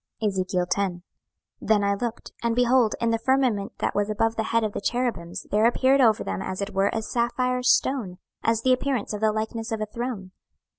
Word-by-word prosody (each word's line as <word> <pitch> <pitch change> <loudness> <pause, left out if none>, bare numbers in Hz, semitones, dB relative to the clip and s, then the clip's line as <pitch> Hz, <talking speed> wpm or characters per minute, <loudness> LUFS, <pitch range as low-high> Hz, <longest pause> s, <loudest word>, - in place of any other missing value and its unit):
26:010:001 185 -2 -1 0.6
Then 215 -2 +2
I 200 0 +2
looked, 235 +3 -4
and, 235 -1 0
behold, 245 -2 +3
in 230 -1 +1
the 225 - +1
firmament 245 -5 +1
that - - -1
was 205 0 0
above 225 +2 0
the 220 - -1
head 230 0 +1
of 215 - -1
the - - -4
cherubims 230 -8 -2
there 215 +2 +4
appeared 265 +3 +3
over 225 -4 +4
them 95 -1 -3
as 190 0 -4
it 200 +1 -4
were 195 +1 +2
a 225 - -2
sapphire 250 +2 0
stone, 250 -6 +1 0.2
as 225 0 +1
the 260 - +5
appearance 255 -4 -1
of 210 - -4
the 220 -1 +3
likeness 220 +1 -4
of 220 - -2
a 215 - -1
throne. 215 -3 -5
220 Hz, 200 wpm, -25 LUFS, 200-245 Hz, 0.6 s, the